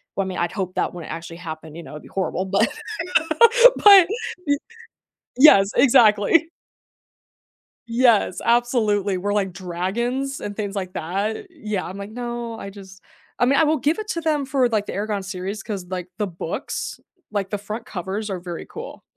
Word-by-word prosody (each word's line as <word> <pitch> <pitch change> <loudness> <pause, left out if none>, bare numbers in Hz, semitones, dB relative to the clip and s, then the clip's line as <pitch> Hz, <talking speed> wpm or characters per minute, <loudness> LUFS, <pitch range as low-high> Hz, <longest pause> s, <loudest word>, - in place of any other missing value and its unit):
well, 195 - 0
I - - -5
mean, 185 - -5
I'd 175 0 -1
hope 185 -3 -4
that - - -1
wouldn't 175 -3 -8
actually 165 0 -7
happen, 160 -2 -8
you 170 - -7
know, - - -11
it'd 150 - -9
be - - -13
horrible 190 0 -2
but 195 +1 +2 1.2
but 395 -4 +9 0.4
y 285 - +4 0.8
yes, 205 -8 +7
exactly. 240 +5 +5 1.4
Yes, 230 -5 +3
absolutely, 215 -5 +2
where, 205 +3 -2
like, 195 -3 0
dragons 235 +10 -3
and 205 - -6
things, 205 -1 -4
like, 185 -2 -4
that 200 - -3
yeah, 215 - -4
I'm, 185 - -7
like, 200 +1 -7
"No, 240 -1 -5
I 200 - -7
just" 190 -1 -13 0.4
I 245 - +4
mean, 275 +3 +3
I - - +5
will 310 +1 +2
give 305 +7 +1
it 430 - -5
to 335 - -2
them 300 -4 0
for, 265 -2 +1
like, 215 -3 0
the - - -6
Eragon 205 -1 -2
series 190 +2 -5
'cause, 200 -5 -5
like, 180 -1 -5
the 210 -1 -1
books, 175 -2 -5 0.3
like, 200 -2 -2
the 205 - -2
front 215 +3 -7
covers 200 +3 -4
are 190 - -3
very 175 -1 -7
cool. - - -9
205 Hz, 180 wpm, -22 LUFS, 185-240 Hz, 1.4 s, but